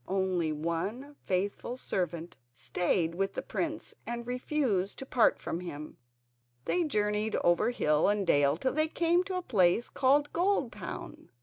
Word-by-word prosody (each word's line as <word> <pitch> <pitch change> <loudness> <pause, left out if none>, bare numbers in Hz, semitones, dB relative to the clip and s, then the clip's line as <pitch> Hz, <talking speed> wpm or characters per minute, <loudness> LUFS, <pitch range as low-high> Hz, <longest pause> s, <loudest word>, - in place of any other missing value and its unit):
Only 185 -4 0
one 170 - -3
faithful 200 +6 -1
servant 175 -7 -3 0.2
stayed 170 +6 0
with 195 +3 -1
the - - -3
prince - - -3
and 235 0 -4
refused 250 -6 -1
to 270 - -6
part 250 -3 +3
from 165 - -4
him. 155 -4 -7 0.7
They 355 - +1
journeyed 210 -6 0
over 175 +6 +3
hill 150 -10 +2
and 205 -1 +1
dale 145 -2 +3
till 260 +9 -1
they 310 +1 +2
came 340 +2 +2
to 380 - -3
a 365 - -3
place 205 - +3
called 285 +2 +2
Goldtown. 280 - -2
205 Hz, 145 wpm, -30 LUFS, 175-260 Hz, 0.7 s, part